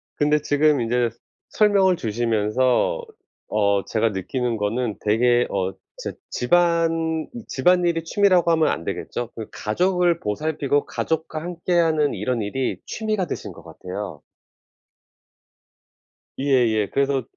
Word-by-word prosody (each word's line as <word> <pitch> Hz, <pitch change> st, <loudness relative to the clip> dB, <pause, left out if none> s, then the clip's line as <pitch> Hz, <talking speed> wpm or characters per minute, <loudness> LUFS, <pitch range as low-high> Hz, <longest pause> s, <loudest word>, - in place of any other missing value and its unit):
근데 150 Hz, +1 st, +2 dB
지금 145 Hz, -2 st, +2 dB
인제 120 Hz, +1 st, +1 dB, 0.4 s
설명을 200 Hz, -3 st, +4 dB
주시면서 120 Hz, -, 0 dB, 0.5 s
어 100 Hz, -2 st, +1 dB
제가 115 Hz, 0 st, +1 dB
느끼는 115 Hz, +5 st, -2 dB
거는 110 Hz, +2 st, -1 dB
되게 120 Hz, +3 st, +3 dB
어 95 Hz, 0 st, -1 dB, 0.2 s
진짜 -, -, -6 dB
집안 165 Hz, +1 st, +1 dB, 0.2 s
집안일이 170 Hz, +3 st, +2 dB
취미라고 185 Hz, -1 st, +3 dB
하면 160 Hz, -1 st, +3 dB
안 85 Hz, -, -2 dB
되겠죠. 120 Hz, +7 st, -4 dB
그 110 Hz, -, -6 dB
가족을 175 Hz, -, +1 dB
보살피고 145 Hz, +5 st, -1 dB
가족과 160 Hz, -1 st, -3 dB
함께하는 170 Hz, -3 st, +1 dB
이런 125 Hz, -3 st, -2 dB
일이 125 Hz, +6 st, -2 dB
취미가 215 Hz, -4 st, -2 dB
되신 -, -, -5 dB
것 -, -, -14 dB
같아요. 90 Hz, -4 st, -7 dB, 2.2 s
예예. 120 Hz, -7 st, +2 dB
그래서 135 Hz, -2 st, +1 dB
140 Hz, 260 characters per minute, -23 LUFS, 115-165 Hz, 2.2 s, 설명을